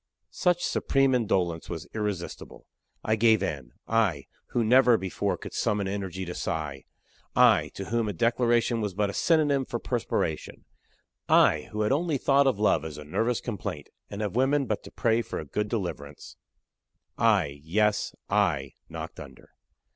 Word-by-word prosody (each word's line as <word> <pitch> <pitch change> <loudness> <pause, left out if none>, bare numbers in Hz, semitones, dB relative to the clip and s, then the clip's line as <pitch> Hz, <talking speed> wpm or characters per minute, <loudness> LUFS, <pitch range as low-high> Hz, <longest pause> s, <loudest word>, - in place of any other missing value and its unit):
Such 175 -1 +1
supreme 135 -1 +2
indolence 90 -9 0
was 80 -2 -5
irresistible. 105 -5 -5 0.4
I 110 - +2
gave 110 -2 +4
in 75 -7 -4
I 110 -9 +1 0.2
who 120 - 0
never 125 +1 +5
before 95 -2 -2
could - - -9
summon 100 -2 0
energy 95 -2 -4
to 90 - -5
sigh 75 -7 -4 0.5
I - - +5
to 95 - -5
whom 115 +1 -1
a - - -3
declaration 120 +3 +2
was 105 -4 -3
but 100 0 0
a - - -12
synonym 145 - +2
for - - -4
perspiration 80 - -3 0.6
I - - +4
who 105 - -2
had 105 - +1
only 155 +1 +1
thought 140 +1 +3
of 130 -6 +2
love 105 -5 +2
as 80 -2 -7
a 75 - -8
nervous 110 +10 -1
complaint, 95 - -5 0.2
and 100 +1 -4
of 105 -1 -3
women 135 +2 +2
but 110 -4 -2
to - - -10
pray 115 0 +1
for 115 - -6
a 80 - -5
good 105 +9 -2
deliverance 85 -10 -5 0.8
I 95 -11 +2
yes 105 +6 0
I - - +1 0.2
knocked - - -7
under. - - -12
105 Hz, 160 wpm, -27 LUFS, 90-120 Hz, 0.8 s, never